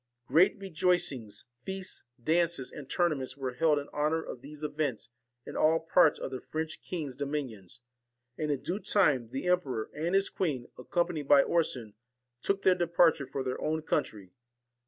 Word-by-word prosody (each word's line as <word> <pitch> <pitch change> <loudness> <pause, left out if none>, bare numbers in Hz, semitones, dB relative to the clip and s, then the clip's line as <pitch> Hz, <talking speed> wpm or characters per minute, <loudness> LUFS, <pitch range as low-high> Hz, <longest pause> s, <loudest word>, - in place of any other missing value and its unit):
Great 175 - +4
rejoicings, 170 - 0 0.2
feasts, 190 0 -4 0.2
dances, 165 -2 +1
and 140 -3 -9
tournaments 140 -7 0
were 130 -2 -3
held 150 +3 +3
in 145 - -3
honour 150 +2 0
of 120 - -8
these 150 +2 -10
events 145 -6 -2 0.4
in - - -8
all 160 +1 +4
parts 160 -1 +4
of - - -5
the 130 - -5
French 160 0 -4
king's 150 -8 -5
dominions; 130 -8 -5 0.5
and, 155 +2 -2
in 140 -3 -1
due 185 +4 -2
time, 145 - +2
the 135 +6 -4
emperor 140 -11 0
and 165 +5 -1
his 195 0 +4
queen, 140 -10 -2
accompanied 170 +2 -1
by 140 -1 +7
Orson, 125 -10 0 0.5
took 195 +5 0
their 185 - +6
departure 170 -5 +3
for 135 0 -3
their 130 0 -3
own 155 0 -1
country. 105 - -2
150 Hz, 160 wpm, -30 LUFS, 130-170 Hz, 0.5 s, by